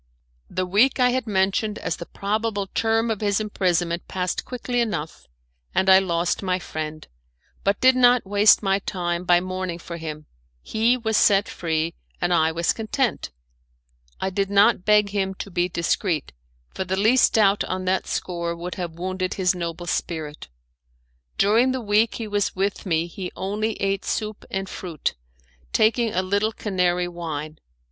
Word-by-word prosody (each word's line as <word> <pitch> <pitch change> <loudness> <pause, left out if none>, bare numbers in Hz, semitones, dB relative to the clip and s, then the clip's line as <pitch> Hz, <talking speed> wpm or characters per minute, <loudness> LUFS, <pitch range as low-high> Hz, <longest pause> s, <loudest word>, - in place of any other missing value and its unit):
The 185 0 -2
week 210 +10 +3
I 250 0 +4
had 255 -2 -1
mentioned 200 +1 +1
as - - -3
the 170 - -8
probable 205 0 -2
term 225 +3 0
of 215 - -3
his 205 -1 +1
imprisonment 175 -5 -1
passed 180 -1 -2
quickly 245 -1 -2
enough, 175 -9 -4 0.5
and 190 0 +4
I 190 - +9
lost 175 -2 0
my 185 -2 0
friend, 155 -3 -6 0.6
but 200 0 +1
did 260 0 +5
not 245 -2 +5
waste 205 +2 +5
my 195 0 +2
time 175 -2 -3
by 175 0 +5
mourning 185 -1 -4
for 170 0 -8
him; 155 -2 -7 0.4
he 230 +3 +2
was 220 -3 0
set 200 0 +4
free, 165 -1 -2 0.3
and 175 0 +1
I 160 -1 +3
was 170 +1 +1
content. 230 +3 -1 0.9
I 190 - -2
did 195 +1 -1
not 200 -1 +4
beg 210 -1 +4
him 195 -2 -1
to 200 - -7
be 175 +1 0
discreet, 170 -2 -1 0.4
for - - -2
the 190 +1 -2
least 225 +6 +4
doubt 205 -2 +4
on 185 0 -3
that 185 +1 0
score 170 -1 -3
would 175 +2 -6
have 170 -2 -4
wounded 185 +1 -3
his 185 -1 +2
noble 170 -1 -5
spirit. 155 -3 -3 0.9
During 230 +6 +4
the 260 - -2
week 215 0 +2
he 225 - -4
was 205 -1 -1
with 195 +1 -2
me 165 -1 +1
he 180 +1 -7
only 210 +3 -2
ate 195 -1 -1
soup 215 -1 -3
and 195 0 -3
fruit, 170 -5 -4 0.6
taking 225 +1 +2
a 185 0 0
little 200 +4 0
Canary 180 -4 0
wine. 155 -3 -6
190 Hz, 165 wpm, -23 LUFS, 175-215 Hz, 0.9 s, I